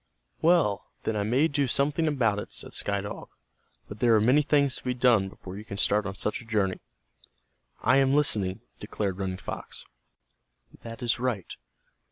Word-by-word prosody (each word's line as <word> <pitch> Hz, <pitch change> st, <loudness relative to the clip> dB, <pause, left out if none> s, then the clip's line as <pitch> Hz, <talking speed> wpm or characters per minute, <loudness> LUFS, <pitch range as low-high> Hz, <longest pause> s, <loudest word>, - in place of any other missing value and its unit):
"Well, 160 Hz, -, +3 dB, 0.2 s
then 110 Hz, -, -1 dB
I 105 Hz, -, 0 dB
may 125 Hz, +9 st, +2 dB
do 140 Hz, -2 st, 0 dB
something 145 Hz, +5 st, +1 dB
about 115 Hz, -9 st, +1 dB
it," -, -, -8 dB
said -, -, -2 dB
Sky 100 Hz, -1 st, 0 dB
Dog. 100 Hz, -, -7 dB, 0.6 s
"But 105 Hz, -, -9 dB
there 120 Hz, -2 st, +4 dB
are -, -, +5 dB
many 125 Hz, +7 st, +4 dB
things 140 Hz, -3 st, +2 dB
to -, -, -11 dB
be 125 Hz, -1 st, -1 dB
done 120 Hz, -6 st, +3 dB
before 95 Hz, 0 st, -10 dB
you 105 Hz, -, -8 dB
can 100 Hz, -2 st, -7 dB
start 105 Hz, 0 st, +2 dB
on 95 Hz, -, -5 dB
such 105 Hz, +4 st, -2 dB
a -, -, -14 dB
journey." 105 Hz, -4 st, 0 dB, 1.0 s
"I 130 Hz, +4 st, +4 dB
am 135 Hz, -1 st, +3 dB
listening," 105 Hz, -9 st, +2 dB, 0.2 s
declared 100 Hz, -3 st, -3 dB
Running 95 Hz, -1 st, -3 dB
Fox. -, -, -7 dB, 1.0 s
"That 115 Hz, +2 st, -8 dB
is 120 Hz, 0 st, +1 dB
right. 120 Hz, -7 st, -2 dB
115 Hz, 180 wpm, -27 LUFS, 100-135 Hz, 1.0 s, are